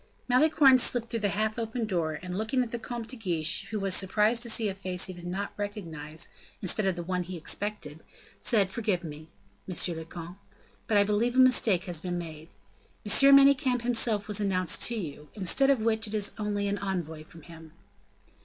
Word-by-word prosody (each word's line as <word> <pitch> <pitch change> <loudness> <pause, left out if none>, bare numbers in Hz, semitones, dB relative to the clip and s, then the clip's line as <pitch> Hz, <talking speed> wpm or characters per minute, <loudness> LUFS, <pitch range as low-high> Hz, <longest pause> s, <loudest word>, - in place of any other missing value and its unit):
Malicorne 265 0 +5
slipped 235 -1 +1
through 230 - -1
the 205 -2 0
half 215 +3 -1
open 230 +1 -3
door, 170 -6 -1
and 180 0 -5
looking 225 +6 0
at 235 - -7
the 235 - -4
Comte 230 0 -6
de 260 - -4
Guiche, 170 -8 -2
who 215 -1 -3
was 195 -1 0
surprised 210 +5 +2
to 240 - +1
see 225 -1 +1
a 195 - -2
face 185 -1 -2
he 185 - -2
did 175 0 -10
not 195 +3 -4
recognize, 165 -7 -5 0.3
instead 195 +1 0
of 190 - 0
the 175 - -5
one 180 +1 -2
he 180 0 -6
expected, 165 -3 -3 0.4
said: 200 -5 +2
"Forgive 205 -5 -1
me, 155 0 -9 0.4
monsieur 180 -1 0
le 160 0 -6
comte, 170 +3 -10 0.5
but 215 - +2
I 200 - +6
believe 215 +4 0
a - - +3
mistake 225 -8 +4
has 175 -4 -2
been 175 +1 -4
made. 160 -2 -8 0.6
M. 275 +7 +6
Manicamp 275 -3 +4
himself 230 -4 +1
was 210 -1 +1
announced 185 -3 +1
to 235 - -3
you, 150 -7 -7
instead 215 +8 +2
of 270 -5 +3
which 220 0 0
it 215 - -5
is 205 -1 0
only 205 -1 -1
an 200 0 -2
envoy 175 -5 -4
from 165 0 -16
him." 160 -1 -13
200 Hz, 200 wpm, -28 LUFS, 175-225 Hz, 0.6 s, I